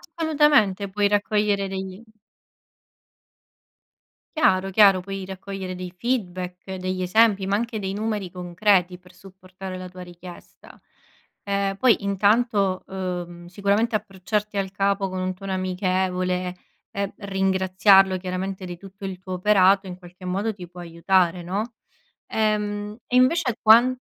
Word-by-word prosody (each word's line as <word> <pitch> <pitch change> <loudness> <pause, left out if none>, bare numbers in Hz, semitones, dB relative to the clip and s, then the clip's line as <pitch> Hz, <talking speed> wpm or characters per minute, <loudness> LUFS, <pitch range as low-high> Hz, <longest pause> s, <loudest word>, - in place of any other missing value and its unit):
Assolutamente, 295 - +3
puoi 205 +1 +1
raccogliere 205 -1 +1
degli 190 +1 -6 2.4
Chiaro, 190 -10 +3
chiaro, 195 -2 +5
puoi 195 0 -6
raccogliere 190 0 -6
dei 180 -1 -7
feedback, 185 -4 -4
degli 185 0 -3
esempi, 195 +1 +3
ma 195 - +1
anche 230 0 -2
dei 190 -1 -3
numeri 210 -3 -3
concreti 180 0 +1
per 180 0 -20
supportare 185 -1 -10
la 185 0 -8
tua 180 0 -11
richiesta. 175 0 -13 0.6
Ehm, 200 -1 -1
poi 240 -4 +3
intanto, 200 -1 +2
uhm, 175 -2 -5
sicuramente 200 +5 0
approcciarti 210 +1 -3
al 190 -1 -1
capo 195 -1 0
con 185 - -4
un 185 0 -2
tono 195 +1 -6
amichevole 185 -1 -1 0.4
e, 200 0 -1
mhmm, - - -15 0.2
ringraziarlo 190 0 +4
chiaramente 185 +1 -4
di 175 -1 -7
tutto 195 +2 -14
il 190 -1 -5
tuo 185 0 -7
operato, 195 0 +4
in 180 - -7
qualche 180 0 -14
modo 200 +5 -1
ti 180 -3 -10
può 180 0 -12
aiutare, 175 +1 +1
no? 210 +7 -3 0.5
Ehm, 210 -1 -1
e 250 - -1
invece 255 -1 +3
quan 240 +3 +6
190 Hz, 135 wpm, -24 LUFS, 185-205 Hz, 2.4 s, quan